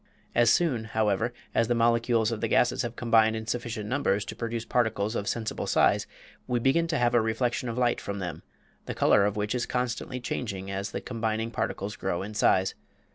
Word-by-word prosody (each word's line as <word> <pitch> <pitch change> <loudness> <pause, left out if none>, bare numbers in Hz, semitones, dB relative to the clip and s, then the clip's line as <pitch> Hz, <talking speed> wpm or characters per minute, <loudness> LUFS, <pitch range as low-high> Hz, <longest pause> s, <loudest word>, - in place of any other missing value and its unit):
As 120 -1 +4
soon, 125 -6 +2
however, 110 +1 0 0.2
as 115 - +2
the 120 - +1
molecules 115 -1 +2
of 115 - -3
the - - +1
gases - - +2
have - - -4
combined 110 -2 +3
in 110 0 -4
sufficient 115 -2 -3
numbers 110 -5 0
to - - -7
produce 115 0 -3
particles 110 -3 0
of 100 - -2
sensible 115 -2 -2
size - - +3 0.4
we 125 -1 +1
begin 135 +8 +2
to 165 -2 0
have 120 -1 +2
a 120 - +5
reflection 120 +2 -1
of 115 - -4
light 120 -1 +1
from 100 - -4
them, 90 -3 -5 0.5
the - - -4
color 100 - +4
of 105 - 0
which 105 +1 -1
is 125 -1 -1
constantly 125 +1 -2
changing 100 -6 -4
as 100 +1 -3
the - - -5
combining 115 -1 -2
particles 100 -3 -3
grow 95 -1 -2
in 105 +2 -7
size. 95 -2 +3
115 Hz, 200 wpm, -27 LUFS, 105-120 Hz, 0.5 s, a